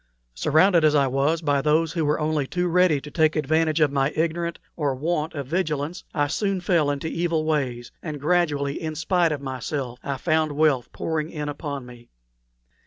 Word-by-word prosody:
Surrounded 165 - +3
as 155 -1 +4
I 140 -1 +4
was 140 +5 0
by 145 -2 +2
those 155 +2 +2
who 165 - 0
were 150 +1 +1
only 150 -2 0
too 180 +3 -1
ready 175 -3 +3
to 150 +2 -11
take 155 0 +2
advantage 155 +1 +1
of 150 -3 +3
my 135 -1 +1
ignorance 170 +1 -1 0.2
or 145 -4 -1
want 155 +3 -2
of 140 -2 -4
vigilance, 155 0 -2
I 145 - +1
soon 195 +6 -1
fell 170 -5 +2
into 145 +2 -2
evil 165 -1 -1
ways, 130 -6 -1
and 155 -3 -5
gradually, 150 -3 0
in 155 -1 -4
spite 170 +1 +1
of 145 -2 -3
myself, 130 -1 -4
I 140 -1 -3
found 155 0 +1
wealth 145 -5 +2
pouring 155 -1 -2
in 150 -3 -4
upon 145 -2 -5
me. 120 -1 -14
155 Hz, 185 wpm, -24 LUFS, 140-165 Hz, 0.2 s, as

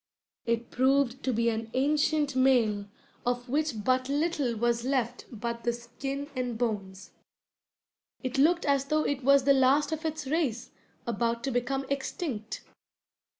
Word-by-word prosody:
It 230 0 -1
proved 265 0 +2
to 260 - +2
be 235 0 +2
an 225 0 -3
ancient 295 +1 +2
male 235 -6 +3 0.4
of 245 0 -1
which 275 -5 -1
but 255 +2 +1
little 290 -4 0
was 235 +1 +1
left 250 -2 -1
but 235 +1 -4
the 240 - +2
skin 270 +4 -5
and 250 -2 -2
bones. 205 -5 -3 1.1
It 255 +1 -2
looked 340 +5 +4
as 280 -2 +2
though 305 +2 +1
it 280 -2 -2
was 275 +1 +5
the 280 +1 +5
last 270 +3 +3
of 315 0 -3
its 315 -1 -3
race, 265 -5 -1 0.3
about 235 +1 -1
to 275 - -1
become 270 +3 -1
extinct. 270 -4 -4
255 Hz, 150 wpm, -29 LUFS, 235-280 Hz, 1.1 s, was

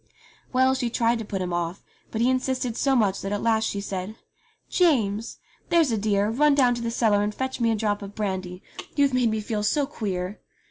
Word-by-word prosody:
Well, 260 +1 +4
she 250 -2 -1
tried 235 0 +1
to 225 - -5
put 195 -2 -3
him 180 -1 -3
off; 175 +2 -3 0.3
but 220 - -3
he 245 - +4
insisted 255 -2 -1
so 270 +1 +2
much 205 -5 +2
that 195 - -4
at 205 - -2
last 220 -1 +2
she 200 - -2
said: 195 +1 -5 0.5
"James! 230 - +1 0.3
there's 335 -6 +4
a - - +2
dear, 205 0 +1
run 290 +4 +4
down 255 -3 +4
to 240 - -4
the 230 - -2
cellar 220 -3 +2
and 210 0 -1
fetch 260 0 -3
me 230 - +3
a 225 - +2
drop 205 -1 -1
of 200 0 -8
brandy. 185 -3 -3 0.3
You've 280 -2 +3
made 250 -2 +3
me 220 0 -1
feel 210 0 -2
so 280 +8 +1
queer 195 -7 -4
220 Hz, 220 wpm, -25 LUFS, 200-255 Hz, 0.5 s, Well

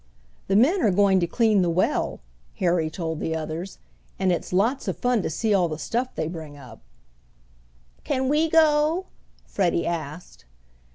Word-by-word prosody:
"The 195 - +1
men 305 - +4
are 215 - +3
going 195 0 +3
to 170 - 0
clean 215 +1 +2
the 175 - +1
well," 170 +2 0 0.3
Harry 170 -3 +1
told 160 -1 -4
the 160 - -2
others, 160 +4 -5 0.4
"and 190 -1 +1
it's 175 - -3
lots 225 +9 +1
of - - -2
fun 245 -3 +1
to - - -3
see 210 +7 0
all 185 -3 +3
the 155 - -4
stuff 240 - -3
they 155 - -2
bring 160 -3 -8
up." 125 -5 -13 1.2
"Can 260 0 -1
we 305 +4 +2
go?" 315 +2 +3 0.4
Freddie 175 -3 0
asked. 165 - -6
185 Hz, 165 wpm, -24 LUFS, 165-245 Hz, 1.2 s, men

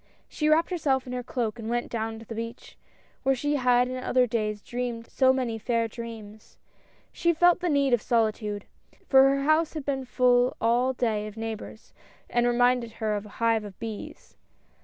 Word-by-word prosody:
She 305 0 -1
wrapped 320 +4 +3
herself 275 -7 0
in 250 - -6
her 250 - -2
cloak 240 -2 -3
and 225 0 -5
went 240 0 -2
down 225 -1 -3
to 225 - -11
the 225 - -7
beach, 230 +1 -7 0.5
where 270 0 +2
she 290 +3 0
had 250 -1 +3
in 255 0 -5
other 255 -1 +3
days 215 -3 -2
dreamed 240 -1 -4
so 260 +1 +3
many 245 -4 -2
fair 230 0 0
dreams. 220 -2 -10 0.6
She 340 0 +2
felt 350 +2 +4
the 360 -1 -1
need 280 -3 +2
of 240 - +3
solitude, 215 -3 0 0.4
for 270 0 +6
her 275 0 0
house 310 +2 +2
had 305 -3 -5
been 270 -2 -2
full 250 0 +2
all 245 +3 +2
day 215 -4 -1
of 215 +1 -10
neigh 225 0 -3
bors, 220 +1 -11 0.4
and 240 0 +2
reminded 245 -1 +2
her 215 -2 -2
of 205 +1 -5
a 205 - -15
hive 230 -1 +2
of 200 -3 -10
bees. 220 -2 -8
240 Hz, 195 wpm, -27 LUFS, 225-265 Hz, 0.6 s, for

